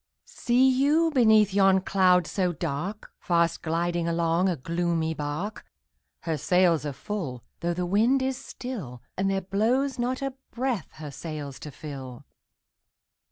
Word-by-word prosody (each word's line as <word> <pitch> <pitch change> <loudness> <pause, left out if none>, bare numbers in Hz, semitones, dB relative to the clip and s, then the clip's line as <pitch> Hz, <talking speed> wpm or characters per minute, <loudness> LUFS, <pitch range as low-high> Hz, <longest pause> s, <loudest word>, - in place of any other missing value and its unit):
See 250 +2 +2
you, 290 +6 +3
beneath 220 -7 +5
yon 195 -1 +4
cloud 185 -2 +3
so 180 +3 -1
dark, 170 +7 -4
Fast 170 -1 +1
gliding 170 +1 -1
along 170 +2 +1
a 180 - 0
gloomy 165 +2 -1
bark? 155 +8 -4 0.6
Her 160 -2 -2
sails 175 -2 +3
are - - -2
full, 140 - -5 0.2
though 170 0 -1
the 180 0 -1
wind 230 +9 +3
is 265 0 0
still, 170 - -7
And 195 +1 0
there 195 0 0
blows 245 +8 0
not 255 +3 -1
a 275 -1 -2 0.2
breath 245 - -2
her 155 -2 -8
sails 145 -2 -6
to 150 - -8
fill! 135 -4 -9
180 Hz, 145 wpm, -26 LUFS, 160-220 Hz, 0.6 s, beneath